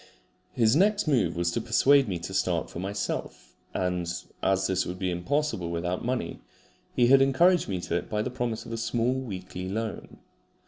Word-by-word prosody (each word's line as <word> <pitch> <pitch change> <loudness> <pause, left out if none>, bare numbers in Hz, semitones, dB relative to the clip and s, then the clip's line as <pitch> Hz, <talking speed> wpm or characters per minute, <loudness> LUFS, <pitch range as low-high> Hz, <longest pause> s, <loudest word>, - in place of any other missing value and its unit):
His 115 +1 +3
next 200 +2 +3
move 135 -10 +2
was 85 0 0
to 115 - -1
persuade 135 +4 +4
me 95 -4 -2
to 85 +3 -7
start 90 -3 0
for - - -6
myself; 95 -10 -4 0.2
and 90 -2 -1 0.3
as 95 0 +2
this 95 -1 +1
would 90 - -5
be 95 -1 -1
impossible 90 - -1
without 90 +2 -2
money, 125 +1 -2 0.5
he 120 - +4
had 135 +2 +6
encouraged 170 - +4
me 95 -2 -1
to 85 - -1
it - - -5
by 105 0 0
the 125 - -3
promise 120 -3 -3
of - - -8
a - - -2
small 120 +1 0
weekly 95 -7 -5
loan. 110 +3 -4
105 Hz, 185 wpm, -27 LUFS, 90-130 Hz, 0.5 s, had